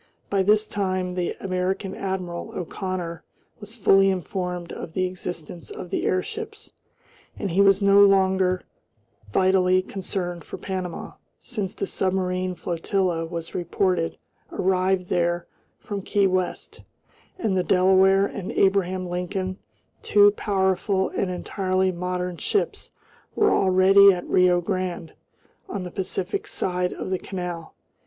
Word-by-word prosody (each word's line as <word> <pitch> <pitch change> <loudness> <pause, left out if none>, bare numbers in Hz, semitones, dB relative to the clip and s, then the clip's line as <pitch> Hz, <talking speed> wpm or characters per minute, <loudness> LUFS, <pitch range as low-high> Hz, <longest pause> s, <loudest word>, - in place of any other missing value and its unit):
By 200 -1 +3
this 210 +2 +3
time 185 -3 -2
the 180 -1 -2
American 190 +1 -2
admiral, 185 -3 -4
O'Connor, 180 -1 -4 0.4
was 210 +1 -8
fully 195 -2 +5
informed 180 -2 -3
of 160 - -7
the 185 -1 +1
existence 175 -2 -6
of 180 - -8
the - - 0
airships, 435 - -3 0.7
and 195 - -3
he 190 +4 +3
was 195 0 +5
no 200 0 +6
longer 190 -2 +4 0.7
vitally 185 - +3
concerned 180 -3 -4
for - - -8
Panama, 185 -3 -5 0.3
since 205 -6 -4
the - - -2
submarine 185 -1 -1
flotilla 175 -1 -1
was 165 -1 -6
reported 175 -1 0 0.3
arrived 185 0 +1
there 175 0 0 0.3
from 200 -1 -5
Key 200 +1 +1
West, 185 -1 -2 0.6
and 215 - 0
the 185 - +3
Delaware 190 +1 +4
and 200 -2 -5
Abraham 190 -1 +2
Lincoln, 180 +2 -3 0.4
two 205 0 +5
powerful 190 -1 0
and 195 - -2
entirely 185 +1 0
modern 180 0 -3
ships, 410 - -2 0.5
were 425 - +3
already 195 +1 +6
at 180 -2 -3
Rio 180 -1 +4
Grande, 185 -3 -3 0.6
on 195 - -4
the 180 - -7
Pacific 190 0 -3
side 180 -1 -1
of - - -5
the 185 - 0
canal. 175 -3 -6
185 Hz, 130 wpm, -24 LUFS, 180-195 Hz, 0.7 s, no